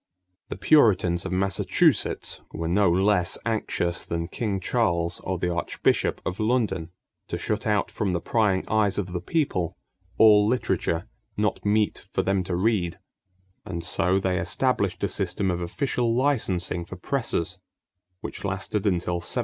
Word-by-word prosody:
The - - -5
Puritans 95 - +3
of - - -6
Massachusetts 95 0 +1
were 80 +1 -4
no 90 +1 +3
less 95 0 +2
anxious 95 -6 -1
than 85 0 -3
King 100 -2 -2
Charles 85 -5 0
or 95 0 -3
the 90 0 -1
Archbishop 85 - 0
of 90 - -3
London 110 -7 0 0.4
to - - -3
shut - - -2
out - - +1
from 100 -3 -1
the 85 - 0
prying 100 -1 +1
eyes 105 -3 +2
of 95 -3 -3
the 90 - -2
people 95 - -1 0.4
all 105 -2 +7
literature 105 -6 0 0.3
"not 105 0 0
mete 105 +1 0
for - - +2
them 95 -1 +1
to 90 - -2
read"; 95 -3 0 0.7
and 85 -2 -5
so 90 +2 +1
they 95 -2 0
established - - 0
a - - +3
system 95 -2 -1
of 90 0 -3
official 115 +5 -1
licensing 105 -10 0
for 90 - -9
presses, 105 -4 -2 0.6
which - - -7
lasted 100 +1 -2
until 90 -2 0
1755. 85 - -7
95 Hz, 150 wpm, -25 LUFS, 85-110 Hz, 0.7 s, all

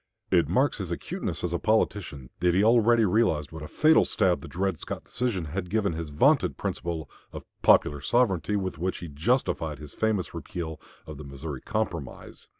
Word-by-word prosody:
It - - +3
marks - - +2
his - - -4
acuteness - - -4
as 90 -1 -1
a 85 - 0
politician 95 - 0
that 90 -1 +2
he 95 - +4
already 115 0 +5
realized 90 -8 +1
what 80 -1 -8
a 75 - -6
fatal 155 - +4
stab 90 -2 +1
the - - -9
Dred 95 -1 -2
Scott - - -6
decision 115 -9 -2
had 90 +4 -4
given 100 -2 +1
his 80 -1 -5
vaunted 75 - +3
principle 85 -3 -3 0.2
of - - -8 0.2
"Popular 75 -1 +4
Sovereignty," 105 - +1
with 95 -5 -3
which 90 +2 -1
he 85 - -7
justified 80 - 0
his 75 0 -10
famous 110 -6 -1
repeal 80 -3 -6 0.2
of 75 -2 -8
the - - -7
Missouri 70 0 -7
Compromise. - - -4
90 Hz, 180 wpm, -27 LUFS, 75-105 Hz, 0.2 s, already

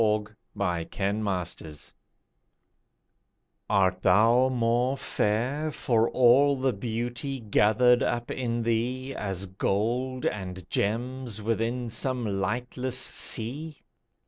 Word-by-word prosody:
SONG 105 -1 +1 0.3
TO 100 - -1 0.6
OBLIVION 85 -5 -4 1.9
Art 95 -2 +2
thou 115 +7 +4
more 125 +2 +1
fair 130 +9 -1
For 115 -6 +1
all 130 +3 +5
the 130 -1 0
beauty 120 +5 -4
gathered 115 +3 +3
up 120 0 -1
in 120 -2 -2
thee, 125 +4 -1
As 95 -5 -3
gold 115 +7 -1
and 95 -3 -4
gems 120 +1 -2
within 115 +2 -1
some 115 -4 -1
lightless 125 +5 -2
sea? 135 +5 0
120 Hz, 95 wpm, -27 LUFS, 105-130 Hz, 1.9 s, all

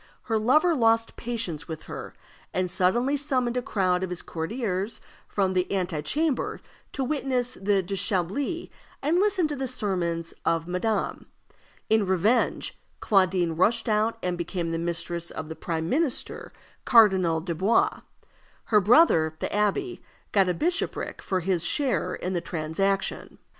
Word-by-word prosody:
her 225 -2 0
lover 305 +10 +4
lost 225 -4 +2
patience 225 -10 -3
with 160 -2 -6
her, - - -8 0.4
and 185 -1 0
suddenly 240 +10 +2
summoned 255 -4 0
a 250 - +1
crowd 185 -6 0
of 190 - -2
his 180 -1 -5
courtiers 195 +3 -3 0.3
from 190 -2 0
the 180 0 0
ante 180 -5 -1
chamber 295 - 0 0.3
to 270 - -2
witness 255 -3 -1
the 195 -2 +1
déshabillé 200 - -1 0.3
and 320 +5 +2
listen 390 -4 +2
to 295 - -3
the 265 -1 -3
sermons 175 -8 -2
of 165 0 0
madame. 195 +4 -2 0.6
In 220 -1 +3
revenge, 200 +6 +1 0.2
Claudine 185 -4 +2
rushed 225 +8 +2
out 215 +1 +1
and 180 -1 -2
became 170 -1 -3
the 165 - -1
mistress 170 0 -2
of 155 0 -7
the 160 - -5
prime 160 -1 -3
minister, 285 - -1 0.3
Cardinal 190 -8 +5
Dubois. 195 - +1 0.6
Her 210 -2 +3
brother, 185 - +5
the - - -3
abbé, 210 - 0 0.3
got 195 -3 +3
a 180 - 0
bishopric 345 - -2
for 185 -1 -1
his 175 -1 0
share 280 -4 0
in 185 - -4
the 175 - -1
transaction. 175 +4 -2
195 Hz, 145 wpm, -26 LUFS, 175-245 Hz, 0.6 s, Cardinal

